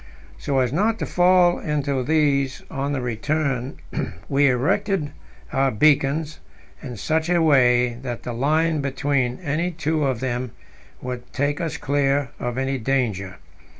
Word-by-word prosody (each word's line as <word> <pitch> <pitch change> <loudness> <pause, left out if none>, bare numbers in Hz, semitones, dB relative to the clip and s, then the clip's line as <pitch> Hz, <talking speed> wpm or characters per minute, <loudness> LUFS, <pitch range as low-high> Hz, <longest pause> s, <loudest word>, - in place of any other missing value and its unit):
So 140 - -1
as 130 -1 +1
not 215 +7 +1
to - - -3
fall 180 0 +4
into 145 -3 -1
these 140 -1 +1
on 140 +1 -2
the 140 -3 -1
return, 130 +2 -2 0.5
we 140 0 +3
erected 150 - 0 0.4
our 135 0 +2
beacons 150 +5 +2 0.4
in 125 -5 -7
such 160 - -1
a 175 -1 +3
way 125 -6 +4
that 120 -3 -5
the 120 - -4
line 155 +5 +1
between 135 -2 0
any 165 +3 0
two 160 -2 -1
of 130 -4 -1
them 125 -1 -3 0.5
would 125 -1 -6
take 145 +4 -1
us 165 -1 -3
clear 140 -2 0
of 120 0 -3
any 135 0 -1
danger. 110 -7 -1
140 Hz, 145 wpm, -23 LUFS, 125-155 Hz, 0.5 s, fall